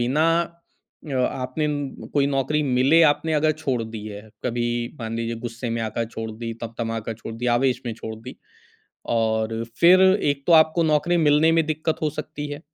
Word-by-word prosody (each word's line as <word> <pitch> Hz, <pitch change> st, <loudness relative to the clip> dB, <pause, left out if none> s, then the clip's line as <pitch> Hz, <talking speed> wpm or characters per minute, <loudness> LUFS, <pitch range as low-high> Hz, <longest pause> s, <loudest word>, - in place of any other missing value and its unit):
बिना 135 Hz, +7 st, +2 dB, 0.2 s
अ, 170 Hz, -3 st, -14 dB
आपने 130 Hz, +3 st, -1 dB, 0.5 s
कोई 140 Hz, -1 st, +3 dB
नौकरी 140 Hz, +2 st, 0 dB
मिले 135 Hz, +4 st, +4 dB
आपने 160 Hz, +2 st, -4 dB
अगर 155 Hz, +1 st, +3 dB
छोड़ 140 Hz, -6 st, -2 dB
दी 110 Hz, -1 st, -7 dB
है, 105 Hz, -1 st, -8 dB, 0.2 s
कभी 120 Hz, -1 st, -1 dB, 0.3 s
मान 115 Hz, 0 st, -4 dB
लीजिए 115 Hz, 0 st, -3 dB
गुस्से 120 Hz, +1 st, -4 dB
में 115 Hz, 0 st, -2 dB
आकर 110 Hz, +1 st, -2 dB
छोड़ 115 Hz, 0 st, -6 dB
दी, 115 Hz, +1 st, -5 dB
तमतमा 115 Hz, 0 st, -3 dB
का -, -, -1 dB
छोड़ 115 Hz, 0 st, -8 dB
दी, 120 Hz, +2 st, -4 dB
आवेश 130 Hz, 0 st, +1 dB
में 115 Hz, -, -2 dB
छोड़ 110 Hz, 0 st, -7 dB
दी 115 Hz, +3 st, -10 dB, 0.8 s
और 110 Hz, 0 st, 0 dB, 0.2 s
फिर 180 Hz, +2 st, +7 dB
एक 145 Hz, -8 st, +2 dB
तो 170 Hz, -, +6 dB
आपको 160 Hz, +1 st, +5 dB
नौकरी 160 Hz, +3 st, +2 dB
मिलने 155 Hz, +1 st, +4 dB
में 165 Hz, -1 st, +3 dB
दिक्कत 155 Hz, +1 st, -1 dB
हो 155 Hz, -, +1 dB
सकती 150 Hz, 0 st, -6 dB
है। 145 Hz, -, -7 dB
130 Hz, 185 wpm, -23 LUFS, 115-155 Hz, 0.8 s, फिर